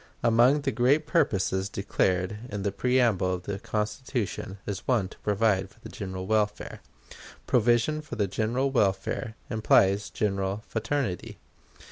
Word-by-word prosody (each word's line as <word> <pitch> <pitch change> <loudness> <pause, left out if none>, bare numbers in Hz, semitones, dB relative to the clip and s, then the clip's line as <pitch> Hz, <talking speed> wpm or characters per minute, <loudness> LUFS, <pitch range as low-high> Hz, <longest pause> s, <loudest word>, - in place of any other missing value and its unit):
Among 120 +5 +4
the - - 0
great 130 +7 +2
purposes 95 -7 +1
declared 95 0 0
in 105 -1 -4
the 100 - 0
preamble 115 -5 +2
of 90 - -8
the 100 +1 -4
Constitution 105 -1 -3
is 100 -2 -5
one 115 -8 +2
to - - -15
provide 100 -2 +1
for 110 - -24
the - - -9
general 95 -2 -6
welfare. 105 0 -1 0.6
Provision 120 +6 +2
for 150 -6 -8
the 105 -3 +1
general 115 +7 -1
welfare 105 -1 0 0.2
implies 105 -2 +3
general 100 0 -1
fraternity. 115 -4 -2
105 Hz, 135 wpm, -27 LUFS, 95-120 Hz, 0.6 s, Among